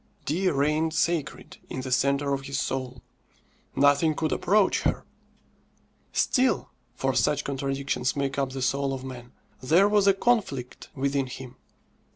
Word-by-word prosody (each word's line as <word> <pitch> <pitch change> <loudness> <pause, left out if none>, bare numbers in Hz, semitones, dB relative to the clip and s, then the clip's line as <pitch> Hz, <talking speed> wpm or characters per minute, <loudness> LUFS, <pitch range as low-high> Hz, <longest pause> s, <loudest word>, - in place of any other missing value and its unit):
Dea 185 +6 +1
reigned 155 +3 +1
sacred 165 -3 -1
in 130 - -4
the 130 0 -6
centre 140 +2 +1
of 135 -1 -3
his 140 -1 -2
soul; 130 -1 -4 0.7
nothing 145 +3 +4
could 155 0 -1
approach 205 +1 +2
her. - - -1 1.1
Still 260 -1 +1 0.2
(for 135 +1 0
such 145 +2 +1
contradictions 135 -2 -2
make 140 0 -1
up 135 -1 0
the 135 -1 -4
soul 135 +2 0
of 130 - -8
man) 125 -2 -9 0.3
there 165 +10 +4
was 205 -1 +3
a 195 - +5
conflict 195 - -1
within 140 0 0
him. 125 0 -9
140 Hz, 145 wpm, -26 LUFS, 135-160 Hz, 1.1 s, a